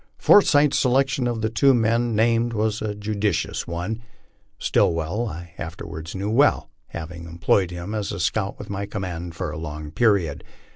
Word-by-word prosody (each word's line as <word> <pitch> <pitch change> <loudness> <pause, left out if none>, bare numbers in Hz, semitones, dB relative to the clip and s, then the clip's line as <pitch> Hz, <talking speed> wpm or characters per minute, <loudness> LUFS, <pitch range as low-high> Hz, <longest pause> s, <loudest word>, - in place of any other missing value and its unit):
Forsyth's 150 -7 +5
selection 135 0 +2
of 120 -2 -2
the 110 - +1
two 130 +4 +4
men 115 0 +1
named 115 +2 +2
was 110 -1 0
a 105 -1 -2
judicious 105 -3 -1
one. 90 +7 -4 0.6
Stillwell 85 +8 +1
I 85 -2 -8
afterwards 80 0 -7
knew 100 +3 -2
well, 140 +5 +3 0.2
having 85 +1 -7
employed 85 +2 +1
him 90 +4 -6
as 105 -2 -2 0.2
scout 95 +4 -1
with - - -8
my 100 0 -4
command 90 -4 -5
for - - -3
a - - -6
long 75 -1 -6
period. 95 -9 +1
105 Hz, 155 wpm, -23 LUFS, 85-115 Hz, 0.6 s, Forsyth's